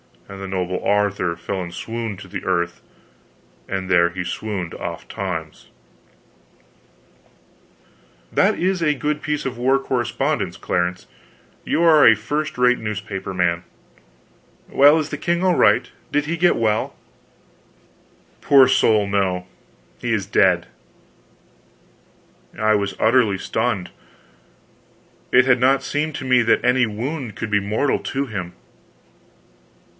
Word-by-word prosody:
And 100 0 -10
the 95 - -5
noble 90 -1 -3
Arthur 100 -4 0
fell 95 +3 -4
in 85 - -5
a - - -13
swoon 115 0 -5
to 95 - -11
the - - -6
earth, 85 -2 -1 0.9
and 95 -1 -3
there 85 -2 +4
he 90 +1 -5
swooned 90 -1 -4
oft - - -7
times—" 80 -5 -5 2.6
"That - - +2
is 185 0 0
a 150 -2 +2
good 150 +2 -2
piece 150 -1 -3
of 130 -2 -4
war 130 +3 +2
correspondence, 120 -3 -2
Clarence; 90 +1 -2 0.6
you 170 - +1
are 160 -3 +6
a 115 - +7
first 145 +9 -3
rate 125 0 +3
newspaper 100 -3 -5
man. 85 -1 0 1.1
Well 145 +3 +6
is 155 -2 -2
the 145 - -4
king 170 +4 -1
all 185 -2 +3
right? - - +3 0.2
Did 145 0 +1
he 165 +3 -2
get 175 +1 +3
well?" 110 -1 0 1.4
"Poor 135 -2 +5
soul, 110 -5 +3
no. 95 -3 -1 0.5
He - - -2
is - - -1
dead." - - +3 1.9
I 110 0 +2
was 100 -1 -1
utterly 110 -4 +3
stunned; 110 -2 -2 1.4
it 125 +1 +5
had 130 -1 +3
not 135 +2 +3
seemed 150 +1 -2
to 135 - -6
me 125 -1 +4
that 115 -1 +2
any 125 0 +3
wound 120 +2 -5
could 115 - -5
be 105 - +3
mortal 105 +8 0
to 140 +1 -3
him. 95 -6 -5
110 Hz, 135 wpm, -21 LUFS, 95-135 Hz, 2.6 s, a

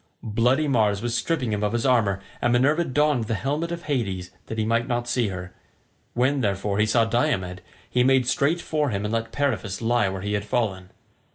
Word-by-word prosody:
Bloody 125 +7 +2
Mars 110 -6 +2
was 120 -1 -1
stripping 125 -1 -1
him 105 - -1
of 105 +1 0
his 120 -1 0
armour, 105 -7 +2 0.2
and 120 - +2
Minerva 140 +7 +3
donned 145 -3 +1
the 115 - -1
helmet 145 +8 -2
of 170 0 -5
Hades, 100 -11 -2 0.2
that 110 - -5
he 110 - 0
might 115 +2 +1
not 120 -1 -1
see 120 -2 +1
her; 90 -2 -6 0.6
when, 130 +3 +2
therefore, 100 -1 -1
he 105 - +3
saw 115 +1 +3
Diomed, 110 -7 0 0.3
he 125 - +2
made 130 -1 +4
straight 140 +7 +1
for 150 -4 0
him 100 -2 -2
and 105 - -2
let 115 0 -2
Periphas 115 -9 -1
lie 120 -2 +2
where 95 0 -5
he 105 0 -2
had 100 0 0
fallen. 105 -5 -2
120 Hz, 205 wpm, -24 LUFS, 105-130 Hz, 0.6 s, made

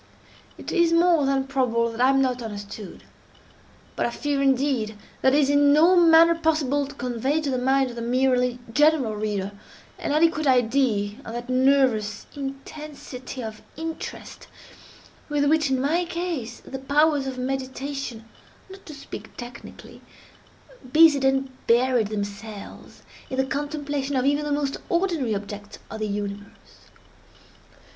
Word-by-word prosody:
It - - -7
is 340 -2 +3
more 335 -3 +4
than 270 -1 +1
probable 240 -4 0
that 230 +1 -5
I 255 - +5
am 270 0 +4
not 250 -1 -1
understood; 205 -2 -8 0.9
but - - -1
I - - -2
fear, 285 +3 -2
indeed, 260 -5 +1 0.2
that 265 +1 +4
it - - +5
is 285 -2 +3
in 285 0 +5
no 330 +5 +6
manner 335 -1 +7
possible 305 -4 0
to 285 - -11
convey 250 +4 -1
to 295 -3 -2
the 255 - 0
mind 265 0 +2
of - - -10
the 235 - -5
merely 250 0 +1 0.2
general 295 -5 +3
reader, 205 -2 -2 0.5
an - - -3
adequate 310 0 +2
idea 235 -5 +2
of 225 - -8
that 240 +1 -6
nervous 255 -5 +2
intensity 275 -2 -7
of 220 -1 -7 0.2
interest 325 0 -7 0.8
with 290 -1 +1
which, 305 0 +2
in 265 -1 +1
my 315 +7 +1
case, 335 -9 -4
the 265 - -7
powers 285 +1 +2
of 260 -1 -5
meditation 265 -2 -4 0.5
(not 385 0 -12
to 305 - -8
speak 280 - -9
technically) 240 -1 -10 0.9
busied 305 -2 +6
and 270 0 +1 0.2
buried 240 -1 +3
themselves, 205 0 -7 0.3
in 260 - -4
the 265 - +2
contemplation 285 0 -3
of 255 0 +1
even 290 +1 +1
the 295 - -3
most 285 -1 -1
ordinary 340 - 0
objects 205 0 -7
of 220 - -6
the 215 - -2
universe. 205 0 -7
270 Hz, 150 wpm, -24 LUFS, 235-290 Hz, 0.9 s, manner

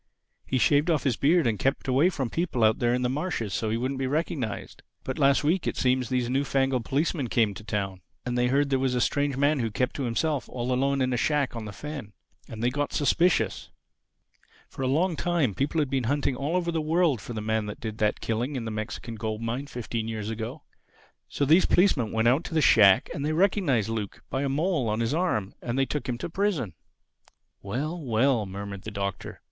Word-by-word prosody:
He 130 - 0
shaved 145 +7 +3
off 160 -4 +2
his 130 -5 +1
beard 160 +5 +3
and 110 -3 0
kept 135 +1 0
away 135 +7 +4
from 135 -9 -3
people 165 -9 -1
out 110 0 +4
there 120 0 +2
on 125 - -1
the - - +2
marshes 135 - -2
so 110 +2 -1
he 110 - 0
wouldn't 130 +3 -2
be 135 - 0
recognized. 140 -6 -3 0.2
But 130 - -4
last 140 0 +4
week, 165 +4 +1
it - - -2
seems 125 -1 +1
these 125 -2 0
new 135 +3 +1
fangled 135 -3 0
policemen 145 -1 0
came 110 -3 +2
to 105 - -10
Town; 100 -3 -3 0.2
and 125 0 -2
they 125 0 +2
heard 140 +2 +1
there 135 - +2
was 130 -1 0
a - - +1
strange 140 +2 0
man 145 +1 +2
who 115 -2 0
kept 125 +5 -1
to 140 - -2
himself 140 +4 -1
all 125 0 -2
alone 135 +2 +1
in 130 -1 +1
a - - 0
shack 145 -1 +1
on 115 -2 -5
the 105 - -6
fen. 140 -1 -7 0.4
And 110 0 -6
they 120 - +2
got 145 +2 -2
suspicious. 170 +4 +1 1.0
For - - -8
a 130 - +1
long 165 +6 +1
time 165 - 0
people 140 - -1
had 145 -3 0
been 130 -3 0
hunting 140 +1 0
all 145 +6 -2
over 175 -1 0
the 165 -1 -1
world 155 - +2
for 120 - -7
the 110 - -3
man 110 0 -1
that 105 - -7
did 110 -1 -6
that 105 -1 +1
killing 120 +6 -2
in 120 -3 -3
the 110 - -3
Mexican 110 +2 -5
gold 110 0 -4
mine 120 +5 -3
fifteen 115 -3 -4
years 110 -1 -4
ago. 115 +6 -5 0.7
So 140 - 0
these 160 +6 +5
policemen 150 - +3
went 110 +1 +1
out 135 +7 +3
to 165 - -5
the - - +4
shack, 100 -6 +6
and 140 - -4
they 155 +2 0
recognized 160 - +2
Luke 110 -3 -4
by 135 - -1
a 140 - 0
mole 150 - 0
on 105 +1 -1
his 115 +3 0
arm. 150 - 0
And 120 +1 -3
they 135 - +3
took 145 -1 -4
him 120 - -1
to - - -4
prison." 170 - -1 0.9
"Well, 150 - -3
well!" 120 -2 +2
murmured 100 0 -6
the 110 - -6
Doctor. 100 -2 -5
130 Hz, 230 wpm, -27 LUFS, 110-145 Hz, 1.0 s, shack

